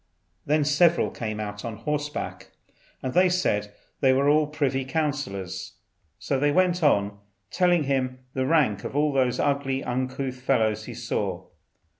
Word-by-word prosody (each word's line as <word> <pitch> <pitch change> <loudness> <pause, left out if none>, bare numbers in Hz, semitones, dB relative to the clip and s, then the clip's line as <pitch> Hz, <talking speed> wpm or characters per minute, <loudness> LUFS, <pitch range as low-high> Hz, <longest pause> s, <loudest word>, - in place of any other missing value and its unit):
Then 150 +1 +3
several 160 +4 +3
came 110 -2 -4
out 105 -1 -5
on 115 -2 -4
horseback, 150 +5 -4 0.5
and 130 - -2
they 185 0 +5
said 105 - 0 0.3
these 130 -1 +5
were 135 +1 +2
the 155 0 +3
privy 140 -3 -1
councillors. 140 - -3 0.4
So 135 - -1
they 145 +1 +3
went 180 +2 +2
on, 100 -9 +2 0.3
telling 175 -3 +3
him 130 -2 -1 0.2
the 130 0 -1
rank 135 -11 +2
of - - -6
all 150 0 +2
the 130 -2 +1
ugly 140 -1 0
uncouth 130 +1 -3
fellows 110 -5 +1
he - - -8
saw. - - -3
135 Hz, 150 wpm, -25 LUFS, 120-150 Hz, 0.5 s, they